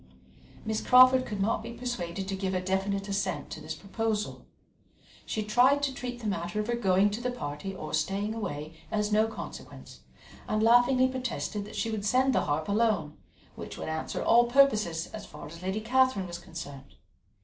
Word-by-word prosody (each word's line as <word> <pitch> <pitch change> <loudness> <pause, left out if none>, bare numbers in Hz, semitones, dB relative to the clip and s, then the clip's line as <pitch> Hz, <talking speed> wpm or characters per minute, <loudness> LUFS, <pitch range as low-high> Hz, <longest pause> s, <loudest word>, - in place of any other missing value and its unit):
Miss 220 0 -1
Crawford 255 0 +6
could 205 -2 -4
not 210 +2 +1
be 235 +1 -7
persuaded 195 -7 -4
to 195 - -2
give 190 -1 -2
a - - +1
definite 195 +2 -1
assent 195 -1 -2
to 155 - -6
this 155 +1 -5
proposal; 210 +4 -3 0.8
she 215 - -2
tried 255 +7 +4
to 275 -1 0
treat 245 -1 -6
the - - -8
matter 175 0 -2
of 210 - -1
her 240 - -1
going 200 -2 +3
to 215 +4 -4
the 250 - -1
party 195 -5 -5
or 155 - -7
staying 195 +7 0
away 155 -8 -5 0.2
as 210 -1 -1
no 215 +1 +4
consequence, 225 - -9 0.5
and 215 0 0
laughingly 245 +3 +5
protested 250 -5 -3
that 210 - -10
she 225 - -1
would 215 -2 -3
send 255 +5 +3
the - - +2
harp 150 +2 -1
alone, 205 -7 +1 0.4
which - - -8
would - - -5
answer 160 0 -3
all 240 +1 +5
purposes 215 -11 +3
as 215 -2 -7
far - - -10
as 165 +3 -10
Lady 190 +3 -2
Catherine 255 -3 +2
was 175 -1 -6
concerned. 140 -5 -9
210 Hz, 185 wpm, -29 LUFS, 185-240 Hz, 0.8 s, Crawford